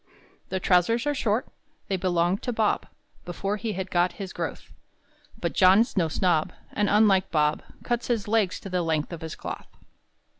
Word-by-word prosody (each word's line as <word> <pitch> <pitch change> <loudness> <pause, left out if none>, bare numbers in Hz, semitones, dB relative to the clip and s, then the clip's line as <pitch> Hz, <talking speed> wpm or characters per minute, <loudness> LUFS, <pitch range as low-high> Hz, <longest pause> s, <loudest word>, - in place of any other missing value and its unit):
The 190 - -1
trousers 185 +7 +2
are 290 - +1
short; 230 -3 0 0.4
They 195 - 0
belonged 180 0 +1
to 245 - -2
Bob 220 -2 0 0.4
Before 195 +4 -3
he 220 0 -3
had 190 0 -5
got 175 0 +2
his 195 -2 -7
growth; - - -5 0.7
But - - -2
John's 195 +5 +5
no 175 -5 +2
snob, 160 -1 +1 0.2
And, 205 -1 +1
unlike 200 -3 +4
Bob, 150 -1 +1 0.2
Cuts 240 -1 -1
his 225 -4 -1
legs 210 -4 +1
to 195 - -7
the 180 -1 +1
length 160 0 -1
of 170 - -7
his 160 -1 -6
cloth. - - -7
190 Hz, 175 wpm, -26 LUFS, 175-215 Hz, 0.7 s, John's